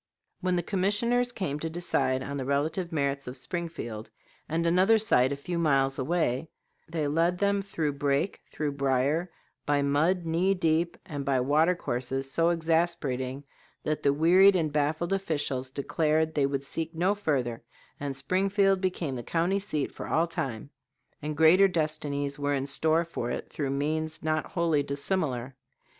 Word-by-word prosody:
When 185 -1 0
the 175 - 0
commissioners 220 +7 +1
came 175 -11 -3
to 160 - -3
decide 145 -6 0
on 140 +1 -4
the 135 - -3
relative 155 +6 -1
merits 140 -3 -1
of 125 +2 -6
Springfield 130 -8 -5 0.4
and 165 +2 0
another 185 +6 +4
site 130 -12 +3
a - - 0
few 170 +5 -4
miles 135 -4 +2
away, 155 -1 0 0.4
they 160 -3 -1
led 165 +4 +1
them 200 +1 +1
through 165 -7 -2
brake, 140 +5 -1
through 150 -1 -2
brier, 140 +5 0 0.4
by 145 -1 +2
mud 160 +6 +2
knee 175 +4 +2
deep 165 -1 +1
and 145 -6 -5
by 135 -2 +1
water 155 +7 +3
courses 135 -2 -3
so 165 +3 +3
exasperating 160 -6 0 0.4
that 155 0 -1
the 140 - +3
wearied 180 +7 +6
and 155 -4 0
baffled 155 +5 0
officials 145 -8 -1
declared 155 +3 0
they 140 -3 +2
would 140 -1 -2
seek 160 +4 -4
no 180 +4 +2
further, 135 - -1 0.4
and 140 -2 -4
Springfield 195 +2 +2
became 180 -6 -1
the 120 - -4
county 170 - 0
seat 155 -8 -2
for - - -7
all 165 - +2
time; 135 -6 -4 0.5
and 150 0 -4
greater 170 +5 +6
destinies 150 -4 -2
were 145 0 0
in 135 0 -1
store 160 +4 +1
for 120 -7 -4
it - - -5
through 145 -3 -2
means 155 +3 -2
not 155 0 0
wholly 165 -4 +1
dissimilar. 140 -3 -2
155 Hz, 160 wpm, -28 LUFS, 140-175 Hz, 0.5 s, wearied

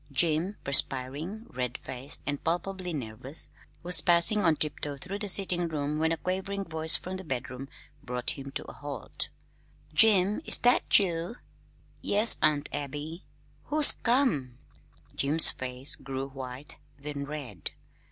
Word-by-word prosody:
Jim, 165 +7 0
perspiring, 140 - 0
red 125 -1 -4
faced, 130 +2 -5
and 145 -1 -4
palpably 180 +2 -3
nervous, 130 0 -4 0.3
was 180 +1 +7
passing 175 +5 +4
on 165 -5 +3
tiptoe 145 -1 -3
through 190 +7 -7
the 205 -1 -4
sitting 180 -3 +2
room 150 -1 -4
when 160 +1 0
a 165 - -1
quavering 190 +3 -4
voice 160 -1 +4
from 185 +1 -4
the 190 - -8
bedroom 130 -2 -6 0.3
brought 125 0 0
him 140 -1 -8
to - - -6
a - - -11
halt. 145 -5 -6 0.6
"Jim, 205 +2 +4
is - - +9
that 245 +1 +3
you?" 175 +1 -2 0.7
"Yes, 210 +3 +4
Aunt 150 -1 +1
Abby." 145 +4 -6 0.4
"Who's 300 0 +7
come?" 230 - -1 0.6
Jim's 150 +4 +6
face 130 +1 -4
grew 135 0 -6
white, 130 +1 -7 0.2
then 140 0 -6
red. 140 - -7
155 Hz, 140 wpm, -27 LUFS, 135-185 Hz, 0.7 s, is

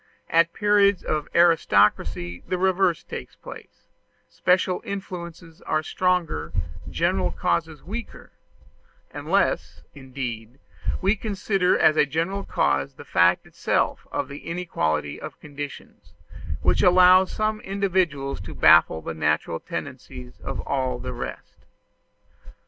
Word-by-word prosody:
At 165 0 +4
periods 205 -1 +3
of 150 -1 -2
aristocracy 105 - +3
the 185 - -1
reverse 185 -2 +2
takes - - -8
place: - - -13 0.4
special 180 0 +1
influences 170 -4 -7
are 155 0 -1
stronger, 180 - -1 0.4
general - - 0
causes 150 - -2
weaker 220 +6 -8 0.8
unless - - -1
indeed 130 -4 -7 0.5
we 195 +3 +3
consider 195 -3 0
as 155 - +4
a 150 - +4
general 170 +7 -2
cause 70 - 0
the - - -12
fact 85 +1 +3
itself - - -1
of 140 - -2
the 140 +1 -8
inequality 80 - -2
of - - -8
conditions, 145 -1 -9 0.5
which - - +3
allows 185 +1 +6
some 215 0 -1
individuals 185 - -1
to 95 - -9
baffle 80 - +5
the 80 - -4
natural 80 +1 0
tendencies 60 -1 -8
of - - -5
all 130 -2 -1
the 125 0 -6
rest. 120 - -8
165 Hz, 115 wpm, -24 LUFS, 125-185 Hz, 0.8 s, allows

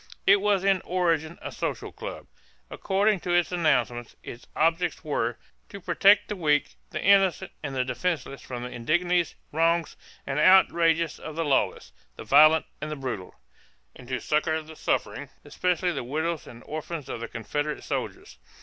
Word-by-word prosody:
It 200 +1 +7
was 200 -2 +2
in 195 -2 +3
origin 170 -3 0
a - - -5
social - - -4
club. - - -8 0.5
According 200 +1 +1
to 175 +1 -2
its 175 0 +2
announcement, 125 -9 0
its 120 - -10
objects 165 +2 +1
were 120 -6 -1 0.3
"to 200 - -8
protect 195 +3 +4
the 210 - -4
weak, 150 -5 +1 0.2
the - - -4
innocent, 195 -3 +3
and 140 -3 -5
the 130 -1 0
defenceless 140 -1 -3
from 120 -1 -6
the 125 - -6
indignities, 175 +7 0 0.2
wrongs, 165 +1 +1 0.3
and 135 +1 -2
outrages 165 -3 +4
of 155 - -8
the 165 0 -1
lawless, 130 -9 0 0.2
the - - -9
violent, 155 +3 +6 0.2
and 155 - -4
the 155 - -4
brutal; 125 -9 -6 0.6
and 125 - -13
to 130 -1 -2
succor 155 +4 0
the 160 +1 -12
suffering, - - -2 0.2
especially 180 0 0
the 140 -6 -4
widows 160 +5 -3
and 120 0 -12
orphans 155 -1 -6
of - - -5
the 115 - -5
Confederate 145 +6 -4
soldiers." - - -5
160 Hz, 165 wpm, -26 LUFS, 140-180 Hz, 0.6 s, It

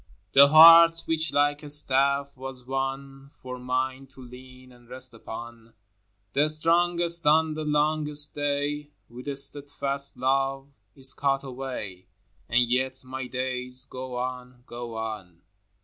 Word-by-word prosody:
hi. - - -30
The 140 +1 +8
heart 165 +2 +8
which, 160 -1 -1
like 145 +1 +1
a 150 - -10
staff, 140 0 +2
was 130 -1 -7
one 135 +1 -5
For 125 0 -8
mine 130 +1 -3
to 135 0 -16
lean 130 +1 -14
and 120 -1 -21
rest 130 -1 -1
upon, 115 0 -10 0.6
The 150 +2 +2
strongest 170 +1 +1
on 155 +1 +3
the 155 0 -5
longest 150 0 -1
day 145 0 -3
— - - -45
With 125 +3 -11
steadfast 140 0 -1
love, 135 +1 -1 0.3
is 135 -1 +2
caught 135 -1 -1
away, 125 -9 -7 0.2
— 90 +1 -39
And 120 +1 +3
yet 130 +2 -2
my 130 0 -7
days 125 0 -1
go 130 -1 -8
on, 125 0 -6
go 120 -1 -8
on. 105 -6 -7
135 Hz, 145 wpm, -25 LUFS, 125-145 Hz, 0.6 s, The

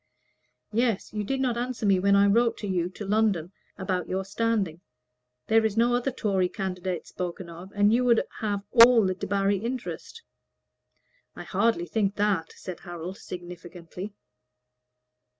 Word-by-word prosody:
"Yes. 230 -3 0
You 210 -1 -2
did 270 +6 -2
not 245 -3 0
answer 245 -2 -3
me 195 -2 +4
when 200 +1 +4
I 200 0 +6
wrote 230 +4 +3
to 210 - -5
you 180 -2 0
to 205 +3 -8
London 200 -5 +1 0.3
about 185 -2 -2
your 190 +1 -2
standing. 200 -5 -1 0.6
There 225 0 +4
is 220 -1 0
no 240 +1 +4
other 245 +2 +1
Tory 195 -7 0
candidate 185 -2 -4
spoken 175 -1 -6
of, 175 +3 -10
and 205 +1 +4
you 245 +2 +3
would 235 -2 +4 0.2
have 205 -2 -2
all 235 -2 +8
the 185 - +1
Debarry 195 +1 0
interest." 260 - -5 1.1
"I - - -7
hardly 200 -2 +1
think 200 +3 0
that," 200 -6 0
said 185 -3 -8
Harold, 175 +1 -7
significantly. 175 +2 -8
200 Hz, 150 wpm, -27 LUFS, 185-225 Hz, 1.1 s, all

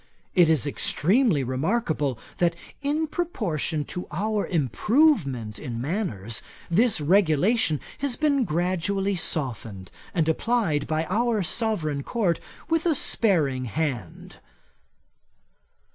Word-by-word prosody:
It 175 -3 +5
is 155 -4 +3
extremely 175 - +2
remarkable, 145 - -1 0.2
that 170 -1 +2 0.3
in 295 +3 0
proportion 205 - -2
to 180 - -5
our 210 +5 -1
improvement 140 - +1
in 115 -2 -5
manners, 120 - -3 0.3
this 220 +2 +3
regulation 170 - +3 0.2
has 275 -3 0
been 285 -2 +2
gradually 185 +3 0
softened, 115 - -2 0.2
and 160 -3 0
applied 160 -4 0
by 160 0 0
our 225 +1 +1
sovereign 170 -8 0
Court 185 - 0 0.3
with 330 +1 +1
a 320 - +3
sparing 150 - +2
hand." 125 - -4
170 Hz, 105 wpm, -25 LUFS, 145-225 Hz, 0.3 s, It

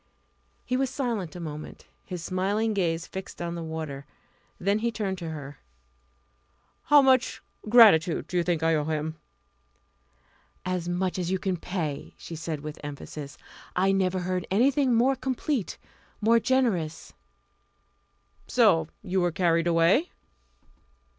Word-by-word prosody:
He 250 - -1
was 265 0 +1
silent 230 - -3
a - - -6
moment, 155 -2 -7 0.2
his 180 -3 -6
smiling 200 +5 0
gaze 170 -4 0
fixed 190 0 -8
on 170 0 -3
the 170 - -5
water. 155 -4 -5 0.5
Then 200 +3 +1
he 235 +1 0
turned 195 -4 -3
to 165 -3 -5
her. 145 -3 -8 1.3
"How 290 -1 +7
much 260 -1 +3 0.3
gratitude 200 -8 +6
do - - -8
you 175 - +4
think 170 -2 0
I 165 0 +3
owe 150 -2 +1
him?" 155 0 -2 1.5
"As 180 -1 -2
much 180 +1 -1
as 175 -1 -2
you 190 - +1
can 185 0 -1
pay," 165 -4 -4
she 165 - -8
said 155 -2 -4
with 150 0 -7
emphasis. 145 0 -7 0.4
"I 190 +2 +3
never 190 -1 +1
heard 180 0 -2
anything 255 +4 +3
more 255 +4 +3
complete, 260 - -2 0.4
more 230 +2 +4
generous." 220 -12 0 1.3
"So 80 -1 +4 0.2
you 185 +1 0
were 175 0 +1
carried 170 0 +2
away?" 170 - +3
180 Hz, 140 wpm, -27 LUFS, 160-215 Hz, 1.5 s, How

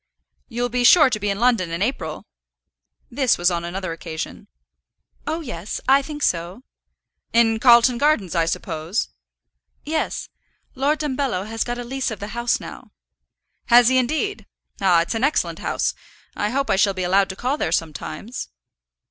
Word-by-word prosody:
"You'll 245 0 -1
be 245 +1 0
sure 300 +1 +7
to 215 - -1
be 205 0 -1
in 200 - -1
London 230 -7 +2
in 170 +3 -2
April?" 180 - -3 0.9
This 255 -1 +2
was 175 +1 +2
on 170 -1 -2
another 185 +1 -4
occasion. 165 -1 -7 0.8
"Oh, 320 +2 -2
yes; 210 - -5
I 275 +1 +6
think 295 +1 -7
so." 175 +7 -1 0.7
"In 225 -1 +3
Carlton 240 0 +6
Gardens, 285 - +2
I 165 -2 +2
suppose." 165 +4 -2 0.8
"Yes; 315 +1 -2 0.5
Lord 280 +4 +1
Dumbello 265 -9 -1
has 225 +1 -2
got 240 0 -4
a 245 - -5
lease 265 +2 -2
of 220 -4 -6
the 205 - -6
house 235 +1 0
now." - - -10 0.8
"Has 240 0 +6
he, 260 0 +4
indeed? 315 - -2 0.3
Ah, 180 -3 +4
it's 175 - -4
an 225 +2 -2
excellent 290 +3 0
house. - - -1 0.4
I 210 - -1
hope 275 +4 -1
I - - +2
shall 195 -1 +3
be 185 - -2
allowed 190 +2 +2
to 190 - -5
call 255 +8 -1
there 160 - -1
sometimes." 165 - -4
230 Hz, 165 wpm, -22 LUFS, 185-260 Hz, 0.9 s, sure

